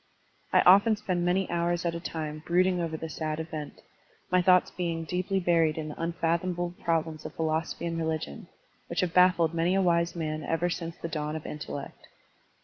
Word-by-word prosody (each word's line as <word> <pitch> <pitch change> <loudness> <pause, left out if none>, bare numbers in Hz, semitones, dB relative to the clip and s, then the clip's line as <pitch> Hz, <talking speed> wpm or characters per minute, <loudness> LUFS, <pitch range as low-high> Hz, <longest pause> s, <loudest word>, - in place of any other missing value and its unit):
I - - +5
often 200 +5 +6
spend 185 -4 -2
many 180 +2 +1
hours 175 0 0
at 170 - 0
a 170 - -4
time 155 -2 -5
brooding 180 +1 +3
over 160 -2 -2
the 160 - -5
sad 155 +1 -3
event, 155 -2 -6 0.5
my 180 0 +4
thoughts 180 0 +4
being 170 -2 -2
deeply 180 +4 -1
buried 165 -3 +2
in 155 -1 -4
the - - -6
tmfathomable 170 +1 -1
prob 165 -1 +1
lems 155 -1 -9
of - - -8
philosophy 160 +1 -1
and 165 -1 -2
religion, 160 - -3 0.4
which - - -1
have 180 -2 -1
baffled 180 -3 +4
many 170 +3 +1
a 195 - +3
wise 170 -1 +2
man 155 -2 -3
ever 170 +3 0
since 165 0 -5
the - - -5
dawn 150 -1 -3
of 155 - -6
intellect. 145 -2 -7
170 Hz, 190 wpm, -28 LUFS, 160-175 Hz, 0.5 s, often